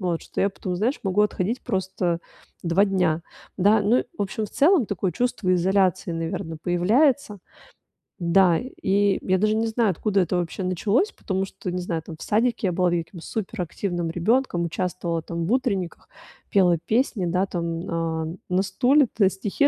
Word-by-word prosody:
вот. 175 -3 -1
Что - - -5
я 200 - +2
потом, 185 -1 -5
знаешь, 230 +9 0
могу 195 +1 +1
отходить 210 +3 -1
просто 190 -4 -1 0.5
2 175 +4 +4
дня, 180 -5 +1 0.3
да. 205 +3 +4
Ну, 215 +5 +3 0.2
в - - +1
общем, 210 +2 -3
в - - -16
целом 315 - +4
такое 190 -2 -2
чувство 200 -3 0
изоляции, 185 0 +2
наверно, 165 0 -4
появляется. 215 - +2 0.8
Да, 175 0 +4
и 200 -5 0
я 185 - +3
даже 215 +3 +2
не 225 +1 +1
знаю, 225 -1 +1
откуда 200 +3 +1
это 180 0 0
вообще 175 +2 -3
началось. 205 - +1
Потому 190 -1 -3
что, 185 -1 -6
не 180 0 -2
знаю, 170 -2 -3
там, 165 - -9
в - - -15
садике 225 -1 +1
я - - +1
была, 180 0 +1
я 170 -1 0
каким-то 165 0 -12
суперактивным 175 -3 -3
ребёнком, 180 +1 +1
участвовала 170 0 -2
там 170 +1 -4
в 195 - -2
утренниках, 215 -9 -1 0.4
пела 180 -4 +4
песни, 220 - 0
да, 180 +3 +1
там, 170 -2 -3
а, 165 -1 -2 0.2
на 180 +1 +2
стуле-то 225 +2 +3
стихи 205 +9 0
190 Hz, 170 wpm, -24 LUFS, 175-215 Hz, 0.8 s, 2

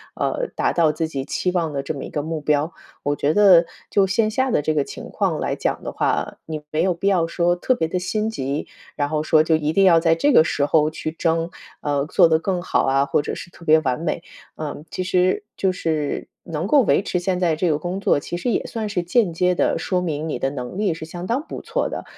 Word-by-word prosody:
呃， - - -1
达 - - +1
到 165 -3 +3
自 160 +1 -2
己 135 -3 -4
期 180 - -1
望 170 -4 -1
的 140 -1 -2
这 150 - -3
么 140 - -6
一 - - -8
个 150 - -2
目 160 +1 -3
标。 150 +2 0 0.3
我 145 0 0
觉 145 +1 +1
得 185 -4 +7 0.2
就 200 - +3
线 215 +3 +2
下 260 +4 +1
的 150 - +2
这 155 +2 0
个 150 -2 +1
情 - - -9
况 - - -1
来 - - -1
讲 - - -2
的 - - -4
话， - - -1
你 155 -1 -5
没 155 - +1
有 185 -1 +2
必 175 +4 -3
要 180 -4 +3
说 175 +1 +1
特 255 +8 +1
别 160 - -1
地 180 +3 -2
心 210 +4 -1
急， 140 -8 -3 0.3
然 145 -1 0
后 155 0 0
说 155 0 +4
就 160 0 +2
一 155 -1 0
定 195 - +4
要 170 -3 +6
在 165 0 +3
这 285 - +2
个 155 - +7
时 145 -3 0
候 150 +1 +3
去 155 0 -5
争 165 +1 0 0.3
呃， 145 -1 0
做 165 - +5
得 160 -1 +3
更 180 +1 -1
好 - - +1
啊， 135 +1 +2
或 145 - +1
者 - - -4
是 - - -8
特 170 - -16
别 160 -1 +5
完 130 -4 -1
美。 165 +1 -2 0.3
嗯， 150 -1 -5
其 185 - -3
实 185 +1 +1
就 190 - +1
是 155 -5 -2 0.2
能 165 +1 -3
够 285 +5 +5
维 215 - +3
持 180 - -1
现 180 0 -1
在 170 -3 +2
这 170 +3 0
个 150 - +2
工 180 +4 -3
作， 195 - +2
其 175 - -6
实 180 - -2
也 - - 0
算 220 -2 -4
是 180 - -1
间 185 +2 +2
接 180 +2 +2
地 - - +1
说 180 -1 -1
明 160 -3 -3
你 - - -2
的 135 - 0
能 130 +4 -6
力 200 -4 +1
是 160 0 -7
相 175 +2 -7
当 250 +7 0
不 - - -6
错 - - -2
的， - - -5
165 Hz, 275 characters per minute, -22 LUFS, 155-185 Hz, 0.3 s, 得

